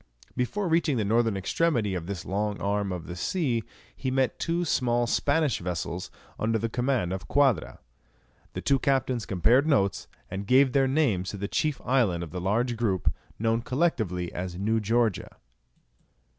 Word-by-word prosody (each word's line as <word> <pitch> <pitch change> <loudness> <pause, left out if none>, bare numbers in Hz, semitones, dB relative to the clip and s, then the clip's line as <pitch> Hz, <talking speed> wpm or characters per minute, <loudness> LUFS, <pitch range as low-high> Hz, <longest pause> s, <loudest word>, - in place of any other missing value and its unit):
Before 190 - -1
reaching 165 -4 +2
the 110 - 0
northern 115 0 +2
extremity 115 - 0
of 85 -2 -4
this 95 -4 -5
long 105 +2 -2
arm 100 0 -1
of 90 -2 -5
the 85 - -7
sea, 120 - -1 0.3
he 130 - -3
met 130 -2 0
two 170 +1 0
small 120 -5 +1
Spanish 145 +2 +1
vessels 90 -1 -4 0.3
under 110 +1 +1
the 115 +1 -2
command 120 -6 0
of 95 - -6
Quadra. 135 - +2 0.8
The - - -4
two 140 -1 +2
captains 130 -4 0
compared 120 - +3
notes, 100 -10 +1 0.2
and 100 +1 -4
gave 130 +2 +5
their 135 -1 +3
names 130 - +1
to 100 - -5
the 100 +1 -3
chief 150 +4 -1
island 110 -10 +2
of 80 - -8
the 90 - -4
large 115 +6 0
group 100 -6 0 0.2
known 115 +1 +1
collectively 115 - -1
as 90 0 -4
New 110 +4 +1
Georgia. 110 -1 0
115 Hz, 165 wpm, -27 LUFS, 95-135 Hz, 0.8 s, gave